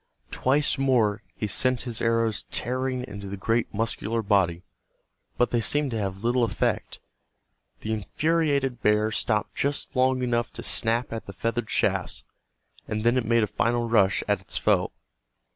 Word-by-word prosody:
Twice 140 Hz, +2 st, +2 dB
more 115 Hz, -6 st, +2 dB
he -, -, -3 dB
sent 125 Hz, +5 st, +1 dB
his 120 Hz, -3 st, -5 dB
arrows 115 Hz, -1 st, +1 dB
tearing 130 Hz, +1 st, -2 dB
into 100 Hz, -1 st, -8 dB
the 100 Hz, -, -5 dB
great 115 Hz, +4 st, 0 dB
muscular 115 Hz, +1 st, -1 dB
body, 90 Hz, -4 st, +2 dB, 0.7 s
but 120 Hz, -, +2 dB
they 120 Hz, -, +2 dB
seemed 145 Hz, +3 st, +1 dB
to 115 Hz, -, -2 dB
have 95 Hz, 0 st, -4 dB
little 120 Hz, +1 st, +2 dB
effect. 115 Hz, -, -1 dB, 0.8 s
The 110 Hz, -, -2 dB
infuriated 140 Hz, +2 st, 0 dB
bear 105 Hz, +1 st, +3 dB
stopped 105 Hz, -1 st, 0 dB
just 140 Hz, 0 st, -2 dB
long 130 Hz, 0 st, +2 dB
enough 120 Hz, -1 st, 0 dB
to -, -, -7 dB
snap 115 Hz, +1 st, +1 dB
at 115 Hz, -, -6 dB
the 100 Hz, -, -7 dB
feathered 115 Hz, +3 st, -2 dB
shafts, -, -, 0 dB, 0.6 s
and 105 Hz, 0 st, -2 dB
then 120 Hz, +1 st, +3 dB
it 125 Hz, -2 st, +1 dB
made 115 Hz, 0 st, +3 dB
a -, -, +4 dB
final 120 Hz, +3 st, 0 dB
rush 100 Hz, -4 st, +3 dB
at -, -, +1 dB
its -, -, -4 dB
foe. -, -, +2 dB
115 Hz, 160 wpm, -26 LUFS, 105-130 Hz, 0.8 s, a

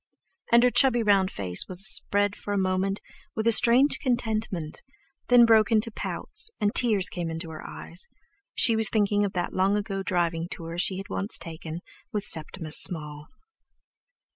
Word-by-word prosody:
And 235 Hz, 0 st, +5 dB
her 250 Hz, -, +3 dB
chubby 240 Hz, -3 st, +4 dB
round 200 Hz, -3 st, +2 dB
old -, -, -13 dB
face 90 Hz, -3 st, -2 dB
was 185 Hz, +3 st, +3 dB
spread 205 Hz, -1 st, +1 dB
for 205 Hz, -, -5 dB
a -, -, -1 dB
moment 190 Hz, +1 st, -2 dB, 0.3 s
with 220 Hz, -, -3 dB
a 230 Hz, -, +4 dB
strange 240 Hz, +5 st, +5 dB
contentment; 220 Hz, -, -3 dB, 0.5 s
then 245 Hz, -1 st, +6 dB
broke 225 Hz, -1 st, +3 dB
into 225 Hz, +1 st, +1 dB
pouts, 335 Hz, -, +2 dB
and 205 Hz, 0 st, -1 dB
tears 215 Hz, -6 st, +2 dB
came 175 Hz, -2 st, -5 dB
into 165 Hz, 0 st, -6 dB
her 155 Hz, -, -9 dB
eyes. 475 Hz, -, -7 dB, 0.5 s
She 230 Hz, -, +4 dB
was 220 Hz, -1 st, +3 dB
thinking 205 Hz, -1 st, 0 dB
of 200 Hz, -, -3 dB
that 175 Hz, -, -4 dB
long 195 Hz, +2 st, +1 dB
ago 195 Hz, -1 st, -4 dB
driving 170 Hz, -3 st, -2 dB
tour 165 Hz, +1 st, -8 dB
she 185 Hz, +1 st, -2 dB
had 195 Hz, -, -8 dB
once 200 Hz, +2 st, -2 dB
taken 160 Hz, 0 st, -8 dB, 0.3 s
with 210 Hz, -1 st, -4 dB
Septimus 160 Hz, -2 st, 0 dB
Small. 150 Hz, -3 st, -2 dB
200 Hz, 170 wpm, -25 LUFS, 175-220 Hz, 0.5 s, then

